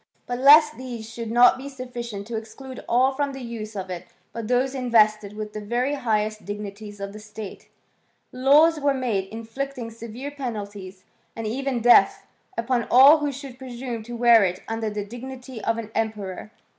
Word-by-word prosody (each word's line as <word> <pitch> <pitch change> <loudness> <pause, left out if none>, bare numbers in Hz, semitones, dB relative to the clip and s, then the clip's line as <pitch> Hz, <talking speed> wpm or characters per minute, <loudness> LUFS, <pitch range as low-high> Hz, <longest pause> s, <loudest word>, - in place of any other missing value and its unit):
But 245 0 -4
lest 300 +3 +7
tins 240 -3 -7
should 230 0 -6
not 240 +2 +5
be 275 +2 -7
sufficient 240 -6 -7
to 230 +1 -6
exclude 225 +4 -8
all 255 +3 +4
from 280 0 -2
the 270 - -7
use 225 -2 -7
of 190 -1 -5
it 175 -2 -6 0.3
but 230 -2 -5
those 250 +2 +1
invested 215 -5 +2
with 210 0 -6
the 215 - -5
very 240 +6 -1
highest 215 -5 -1
dignities 205 0 -7
of 200 0 -6
the 215 - -9
state, 215 -1 -9 0.6
laws 295 +5 +5
were 285 -1 +2
made 230 -7 -1
inflicting 230 +2 -5
severe 230 +5 -7
penalties, 205 -8 -6 0.3
and 225 - -5
even 255 +2 -2
death, 240 +1 +5 0.3
upon 235 0 0
all 275 +5 +8
who 295 -1 -1
should 270 -2 -9
presume 245 -2 -6
to 240 +2 -8
wear 235 -2 +6
it 185 -1 -2
under 225 -1 -2
the 210 -1 -4
dignity 250 +1 -9
of 225 0 0
an 225 -2 -6
emperor. 215 -3 -3
235 Hz, 175 wpm, -24 LUFS, 215-260 Hz, 0.6 s, all